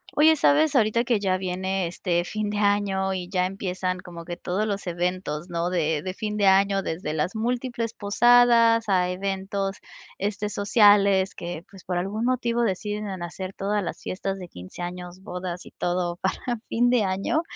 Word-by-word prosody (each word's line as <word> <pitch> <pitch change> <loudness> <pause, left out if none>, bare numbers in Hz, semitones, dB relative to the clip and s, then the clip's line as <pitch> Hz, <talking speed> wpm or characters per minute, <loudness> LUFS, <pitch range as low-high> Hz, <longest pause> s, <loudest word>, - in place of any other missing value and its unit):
Oye, 315 +2 +6
¿sabes? 300 +1 +4
Ahorita 230 -1 +3
que 235 -3 +1
ya 190 -2 +1
viene, 190 0 -2
este, 175 0 -1
fin 215 +3 -3
de 205 0 -2
año 200 -2 +1
y 180 -2 -4
ya 180 -1 +1
empiezan 185 -1 -3
como 175 -2 -9
que 175 +1 -6
todos 185 +4 -1
los 200 -3 -3
eventos, 175 -2 -2
¿no?, 170 0 -1
de 160 -4 0
de 185 +3 -4
fin 210 +1 -4
de 205 - +2
año, 195 +1 +4
desde 160 -3 -3
las 160 +6 -1
múltiples 235 0 -2
posadas 230 +1 +5
a 180 -2 +2
eventos, 195 +1 -2 0.4
este, 205 +1 -2
sociales 205 -2 +4
que, 170 -1 -6
pues, 190 -2 -14
por 180 -1 -2
algún 200 +5 -2
motivo 240 -1 +1
deciden 210 0 -2
hacer 185 +2 -6
todas 205 +1 -1
las - - -5
fiestas 195 +1 -4
de 180 - -7
15 90 - -10
años, 180 +1 -6
bodas 180 -2 -6
y - - -12
todo 175 -1 -1
para 190 - -1 0.3
fin 240 +1 +3
de 245 -3 +3
año, 195 +10 0
195 Hz, 180 wpm, -25 LUFS, 180-210 Hz, 0.4 s, Oye